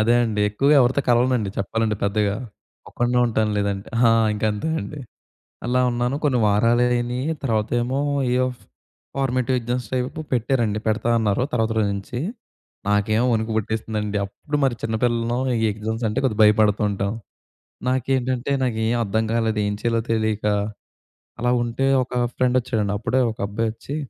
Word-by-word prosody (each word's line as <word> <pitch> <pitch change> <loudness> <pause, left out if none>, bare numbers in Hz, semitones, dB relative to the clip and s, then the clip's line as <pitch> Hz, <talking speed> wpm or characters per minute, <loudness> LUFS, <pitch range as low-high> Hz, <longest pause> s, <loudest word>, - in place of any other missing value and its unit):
అదే 115 +2 +4
అండి 105 -2 -1
ఎక్కువగా 140 +8 +3
ఎవరితో 130 +3 +3
కలవనండి, 120 -3 +3
చెప్పాలంటే 110 +1 -1
పెద్దగా. 100 0 +1 0.5
ఒక్కడినే 120 0 0
ఉంటాను 110 -2 0
లేదంటే 100 -1 -2 0.2
ఆ! - - +5 0.2
ఇంక 105 - -3
అంతే 105 +10 -3
అండి. 150 - -7 0.7
అలా 125 +1 +1
ఉన్నాను 120 +2 -1
కొన్ని 130 -5 +2
వారాలు 115 +4 +3
అయినియి, 120 +3 -1 0.2
తర్వాతేమో 120 +3 0 0.3
ఏయెఫ్ 125 -2 0 0.5
ఫార్మేటివ్ 130 -1 0
ఎగ్జామ్స్ 120 -1 -3
టైపు 130 +5 -2
పెట్టారండి. 115 -3 +1
పెడతా 110 +2 0
అన్నారు 110 +3 +1
తర్వాత 115 -1 +1
రోజు 105 - +2
నుంచి. 100 +5 -5 0.7
నాకేమో 110 +3 +2
వణుకు 110 0 -1
పుట్టేస్తుందండి. 110 -1 -2
అప్పుడు 145 +9 -4
మరి 130 -3 +2
చిన్న 110 0 -1
పిల్లలం 120 0 +1 0.2
ఈ - - 0
ఎగ్జామ్స్ 110 +2 -4
అంటే 105 - -1
కొద్దిగా 115 -5 0
భయపడుతూ 105 0 +4
ఉంటాం. 100 +1 -2 0.8
నాకేంటంటే 130 0 0
నాకేం 110 -1 0
అర్థం 110 +2 0
కాలేదు, 110 -2 0
ఏం 105 - -1
చేయాలో 115 -1 +1
తెలియక 110 -2 0 0.9
అలా 120 0 +1
ఉంటే, 120 +3 -1 0.2
ఒక 125 - -20 0.2
ఫ్రెండ్ 125 0 +2
వచ్చాడండి. 110 -5 -1
అప్పుడే 130 +5 0
ఒక 110 - -9
అబ్బాయి 110 +3 -1
వచ్చి, 115 +5 -8
115 Hz, 145 wpm, -22 LUFS, 105-125 Hz, 0.9 s, ఆ